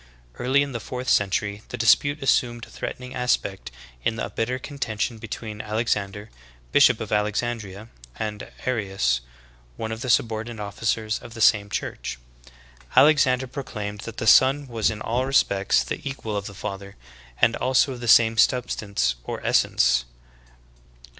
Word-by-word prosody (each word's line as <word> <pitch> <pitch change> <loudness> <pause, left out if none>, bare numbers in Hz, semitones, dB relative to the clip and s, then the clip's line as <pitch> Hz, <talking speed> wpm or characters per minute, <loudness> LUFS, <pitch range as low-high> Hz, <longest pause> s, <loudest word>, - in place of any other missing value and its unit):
Early 135 +3 +3
in 140 - -5
the 120 - -4
fourth 125 +3 -6
century 100 +1 +1
the 125 - -5
dispute 140 +6 +3
assumed 120 -3 +1
a - - -18
threatening 125 0 -6
aspect 125 -6 -1 0.3
in 115 - 0
a - - -4
bitter 125 +3 -1
contention 120 -4 -3
between 110 -1 -6
Alexander, 105 -1 -2 0.4
bishop - - +5
of - - -6
Alexandria, 105 -1 -2 0.3
and 105 -1 -5 0.2
Arius, 95 - 0 0.6
one 110 0 -4
of 110 +1 -5
the 130 - -4
subordinate 115 0 0
officers 110 +1 -2
of 115 - -12
the - - -8
same 105 -2 +4
church. - - -4 0.8
Alexander 135 -4 +5
proclaimed 105 -6 -6
that 115 -1 -8
the - - -3
Son 135 +5 +5
was 115 -4 0
in 110 -1 -5
all 120 +3 0
respects 100 -7 +2
the - - -5
equal 135 -6 -4
of 100 -1 -3
the 100 - -10
Father, 100 0 -6 0.4
and 115 - +4
also 130 +1 +2
of 125 - -9
the 120 - -6
same 115 0 +6
substance 100 - +1
or - - -5
es - - +5
sence. - - +2
110 Hz, 155 wpm, -24 LUFS, 105-125 Hz, 0.8 s, same